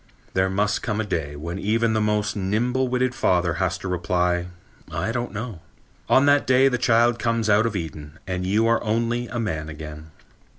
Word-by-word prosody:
There 95 0 +2
must 105 +2 0
come 105 -2 -2
a - - +1
day 75 -7 -3
when 85 +5 -5
even 115 +2 +1
the 110 - +1
most 105 0 0
nimble 120 +7 0
witted 125 0 0
father 90 -8 +1
has 90 -2 0
to - - -7
reply, 90 0 0 0.4
"I 110 - -2
don't 120 0 -3
know." 105 -3 -6 0.5
On 135 - +5
that 145 0 +4
day 130 +1 +5
the 125 -2 -1
child 120 0 +3
comes 115 -1 +1
out 105 +3 +4
of 115 - -4
Eden 80 -3 -6
and 90 -1 -3
you 105 +5 +2
are 115 0 +2
only 115 +2 0
a 120 +1 -4
man 80 -9 -3
again. 75 0 -9
105 Hz, 195 wpm, -23 LUFS, 90-115 Hz, 0.5 s, On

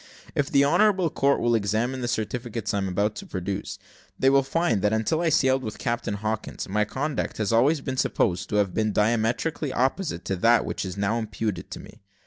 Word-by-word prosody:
If 145 -1 0
the 140 0 +4
honourable 185 +1 +3
court 140 +1 +2
will 120 0 +2
examine 115 +4 0
the 120 - -2
certificates 115 -1 -3
I 100 - +1
am 95 - -1
about 100 +3 0
to - - -8
produce, 95 +1 -4 0.4
they 135 - +4
will 140 0 +5
find 135 - 0
that, 105 +1 +2
until 110 +9 0
I 170 - +2
sailed 130 -3 +3
with 110 -3 -5
Captain 120 -4 -2
Hawkins, 110 +1 -4
my 105 +2 +1
conduct 145 +7 -3
has 110 +1 0
always 140 +6 +3
been 130 -2 -4
supposed 90 -7 0
to - - -2
have 100 -3 +1
been 110 -1 0
diametrically 115 +7 0
opposite 130 - -1
to 95 - -1
that 115 +5 +4
which - - -3
is 95 +1 -6
now 100 +4 0
imputed 105 -5 -4
to - - -7
me. - - -14
115 Hz, 205 wpm, -25 LUFS, 105-135 Hz, 0.4 s, will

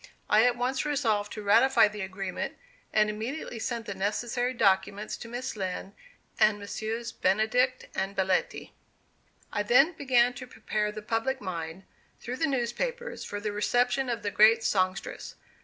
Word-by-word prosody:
I 215 +2 +6
at 245 - +2
once 250 +2 0
resolved 225 -9 0
to 215 - -6
ratify 215 +4 +5
the 210 0 -7
agreement, 190 0 -4 0.3
and 215 0 +3
immediately 225 +4 -4
sent 230 0 -3
the 200 - -4
necessary 235 +5 -1
documents 205 -2 +1
to - - -9
Miss 245 +2 -5
Lind 190 0 -4 0.5
and 215 -1 +5
Messrs. 220 +3 -4
Benedict 220 +6 +1
and 195 +1 -2
Belletti. 190 -1 0 0.8
I 205 - +1
then 250 - +5
began 250 -5 +3
to 255 +1 -9
prepare 215 -2 -2
the 215 0 -8
public 230 +5 -1
mind, 170 -2 -5 0.4
through 250 +2 -5
the 320 - +1
newspapers, 475 - -2
for 205 - -5
the 210 0 -3
reception 245 +5 +1
of 230 -3 -2
the 205 - -1
great 220 +3 +5
songstress. 185 -2 -1
220 Hz, 155 wpm, -28 LUFS, 205-245 Hz, 0.8 s, I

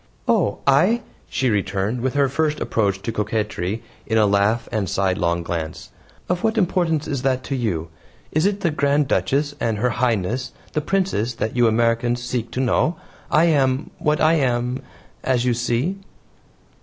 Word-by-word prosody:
"Oh, 100 - +2
I," 180 - +4 0.3
she 125 +2 +1
returned, 100 +3 -1
with 130 +2 -1
her 140 -1 +4
first 150 +3 0
approach 100 -3 0
to 115 - -2
coquetry 105 -2 -2 0.2
in 110 - +1
a 110 - +5
laugh 100 +3 +2
and 110 -3 0
a - - -7
sidelong 90 -3 0
glance, 80 -2 -5 0.4
"of 180 0 -1
what 225 0 +1
importance 175 -6 +1
is 140 -4 -2
that 130 -1 0
to 135 - -3
you? 90 -10 -2 0.4
It 155 - +1
is 200 +1 +2
the 180 -5 0
Grand 145 -1 +2
Duchess 145 +3 +1
and 110 -2 0
Her 125 +4 +1
Highness 120 +1 -1 0.2
the 155 - 0
Princess 150 - 0
that 110 0 -3
you 120 -1 +4
Americans 115 +2 +1
seek 120 -1 -2
to - - -4
know. 130 +6 +2 0.3
I 160 - +4
am 135 -4 +2
what 150 -1 +1
I 155 +1 +4
am 125 -1 0 0.4
as 125 -2 +1
you 125 - +3
see." 120 +11 -1
125 Hz, 170 wpm, -22 LUFS, 110-145 Hz, 0.4 s, a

